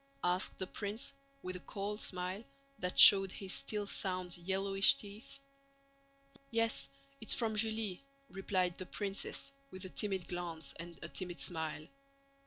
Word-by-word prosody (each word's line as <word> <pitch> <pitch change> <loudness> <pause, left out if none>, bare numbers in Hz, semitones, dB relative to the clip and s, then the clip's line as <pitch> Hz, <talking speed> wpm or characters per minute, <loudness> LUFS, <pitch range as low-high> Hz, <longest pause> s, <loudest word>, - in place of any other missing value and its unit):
asked 180 +1 0
the 190 - -3
prince 205 +6 -4 0.3
with 185 0 -5
a - - -5
cold 205 +3 -5
smile 185 +3 -2 0.4
that 180 0 -3
showed 195 -2 +11
his 195 -1 -4
still 210 -1 -1
sound, 185 -3 -2
yellowish 195 +4 +4
teeth. 210 0 -11 1.1
"Yes, 230 -11 -1 0.3
it's - - +5
from 225 -3 -1
Julie," 220 -1 0 0.3
replied 185 -2 -1
the 185 - -7
princess 205 +7 -4 0.2
with 185 -4 -8
a - - -6
timid 190 -3 -2
glance 175 -2 -5
and 170 0 -9
a - - -5
timid 175 0 -5
smile. 160 -3 -2
190 Hz, 140 wpm, -34 LUFS, 180-205 Hz, 1.1 s, showed